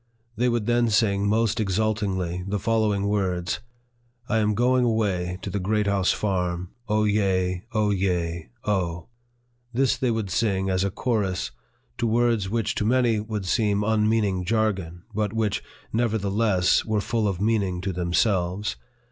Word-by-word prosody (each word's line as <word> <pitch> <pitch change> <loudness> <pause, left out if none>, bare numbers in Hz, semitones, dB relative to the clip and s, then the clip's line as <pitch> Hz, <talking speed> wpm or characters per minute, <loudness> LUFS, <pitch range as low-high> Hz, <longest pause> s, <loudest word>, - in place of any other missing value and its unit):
They 125 +3 +2
would 120 -3 0
then 120 0 +2
sing 100 -2 +2
most 115 +1 +1
exultingly 95 -4 -1
the 105 +1 -1
following 105 -1 +1
words: 90 -4 -1 0.3
" 120 0 -41
1 110 -2 +1
am 105 -1 +1
going 125 +2 +3
away 100 -6 0
to 100 - -4
the 100 - -1
Great 105 +3 0
House 100 -2 +2
Farm! 90 -3 -1 0.2
O, 105 0 +2
yea! 95 -4 +1
O, 105 -2 +1
yea! 85 -5 -1 0.2
O! 85 -4 -1 0.3
" 120 0 -41
This 135 +1 +3
they 130 -2 0
would 110 -4 -2
sing, 95 -2 +1
as 95 0 +1
a 100 - +1
chorus, 100 -3 -1 0.5
to 120 - +1
words 115 -3 +2
which 110 -1 0
to - - -1
many 120 -1 +2
would 105 -2 -4
seem 105 +1 +1
unmeaning 105 -3 +1
jargon, 95 -5 -1
but 105 -1 -1
which, 110 -3 0 0.3
never 115 -1 +1
theless, 100 -2 +2
were 110 -1 0
full 110 +1 0
of 95 -3 -2
meaning 100 -4 +1
to 95 0 -2
themselves. 90 +2 0
105 Hz, 160 wpm, -25 LUFS, 95-115 Hz, 0.5 s, going